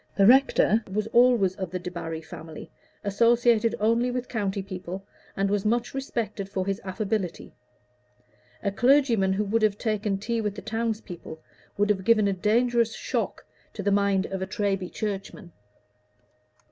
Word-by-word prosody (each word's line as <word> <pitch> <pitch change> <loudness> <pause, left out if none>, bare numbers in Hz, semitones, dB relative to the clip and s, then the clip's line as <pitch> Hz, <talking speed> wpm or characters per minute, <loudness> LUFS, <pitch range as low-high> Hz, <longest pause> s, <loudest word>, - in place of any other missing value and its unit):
The 200 - +4
rector 235 -2 +5
was 210 +2 -1
always 240 -6 +5
of 190 -3 -4
the 185 +1 -4
Debarry 165 -2 -5
family, 160 0 -10 0.3
associated 230 +2 +3
only 230 +3 +2
with 250 0 -3
county 200 -4 -2
people, 185 0 -7 0.3
and 195 0 +2
was 200 0 0
much 235 +3 0
respected 230 -7 -3
for 190 -1 -2
his 195 0 -2
affability; 195 -1 -3 1.1
a 200 - 0
clergyman 235 -4 +3
who 205 +2 0
would 220 +3 +1
have 210 -2 +2
taken 210 -3 -1
tea 225 +3 -2
with 210 -2 -2
the 200 - -7
townspeople 215 -7 -4 0.4
would 205 +1 +3
have 190 -2 -1
given 215 -1 +4
a 200 - +1
dangerous 230 +3 +2
shock - - -3 0.3
to 205 - -5
the 200 - +1
mind 200 -1 +2
of 190 -1 -5
a 190 - -2
Treby 195 -2 -2
churchman. 195 -2 -5
205 Hz, 155 wpm, -26 LUFS, 195-230 Hz, 1.1 s, rector